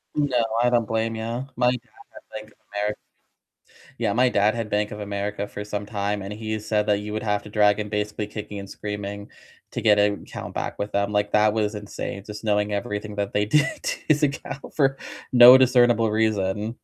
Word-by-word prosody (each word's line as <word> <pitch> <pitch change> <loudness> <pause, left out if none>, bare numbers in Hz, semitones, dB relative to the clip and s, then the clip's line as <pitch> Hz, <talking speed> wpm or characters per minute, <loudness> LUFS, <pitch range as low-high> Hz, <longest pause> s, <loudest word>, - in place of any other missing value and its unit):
No, 135 -5 +1 0.2
I 120 - +4
don't 120 -2 +2
blame 115 +1 -1
you. 115 +3 -4
My 125 0 +3
dad 125 - -2 0.3
had - - -12
Bank 110 0 -8
of - - -27 0.2
America. 105 +1 -2 1.0
Yeah, 110 -4 +1
my 125 +1 +4
dad 105 -1 +2
had 115 -2 -4
Bank 105 0 0
of 105 - -7
America 100 0 -3
for 105 - -7
some 105 0 -4
time, 105 -1 -2
and 95 +1 -6
he 110 0 -4
said 105 0 0
that 105 -1 +2
you 105 +1 -6
would 110 - -3
have 105 -1 0
to - - -10
drag 105 0 +3
him 105 - -3
basically 105 0 -2
kicking 105 -1 -7
and 100 0 -9
screaming 100 0 -6 0.4
to - - -4
get 105 -2 +5
an 105 0 +2
account - - -8
back - - -4
with 100 +1 -4
them. 100 +1 0
Like, 105 0 0
that 105 0 +4
was 105 -1 0
insane, 105 -1 -6
just 105 +1 -9
knowing 105 -1 +1
everything 105 +1 -4
that 100 -1 -3
they 105 0 +2
did 150 - +1
to - - -1
his 150 0 +3
account 140 -1 -2
for 135 -2 +2 0.4
no 125 +1 +10
discernible 120 -3 +4
reason. 105 0 0
105 Hz, 210 wpm, -24 LUFS, 105-115 Hz, 1.0 s, no